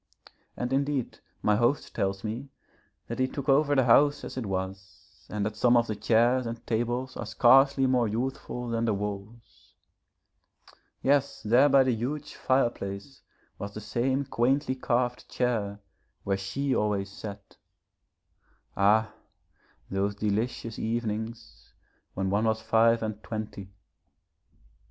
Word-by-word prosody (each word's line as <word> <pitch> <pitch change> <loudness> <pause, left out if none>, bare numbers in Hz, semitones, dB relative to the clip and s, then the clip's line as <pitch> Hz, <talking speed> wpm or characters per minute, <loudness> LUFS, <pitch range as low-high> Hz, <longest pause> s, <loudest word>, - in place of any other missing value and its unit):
And 125 +1 -2
indeed 140 -2 -1 0.2
my 105 -1 +3
host 120 +5 +1
tells 95 0 -1
me 115 +6 -5 0.6
that - - -5
he 130 - +3
took 135 0 -6
over 145 +1 +4
the 135 - +4
house 145 +4 +4
as - - -7
it 125 -5 -4
was, 95 -1 -6
and 105 -1 -2
that 105 0 -3
some 120 +2 +4
of 120 - +3
the 110 - -3
chairs 120 +4 +2
and 115 0 -6
tables 120 +3 -1
are 120 - -5
scarcely 135 +4 +5
more 125 -3 +2
youthful 125 +2 -3
than 115 0 0
the 110 -3 +1
walls. 105 +3 -7 1.3
Yes, 140 0 +1
there 125 +7 +5
by 135 -1 +6
the 130 -1 +1
huge 140 +6 -4
fireplace 120 -2 -1 0.4
was 100 0 -6
the - - -4
same 125 +6 -1
quaintly 135 +2 +1
carved 125 -1 -1
chair 110 -5 -1 0.4
where 100 - 0
she 130 +9 -2
always 100 -2 0
sat. 100 0 -9 1.2
Ah, 110 +2 +3 0.8
those 100 +1 0
delicious 110 +2 -2
evenings 110 0 -4 0.4
when 95 0 -1
one 105 +3 +2
was 110 0 +1
five 115 +1 +3
and 110 -1 -4
twenty. 105 -3 -6
115 Hz, 135 wpm, -28 LUFS, 105-130 Hz, 1.3 s, by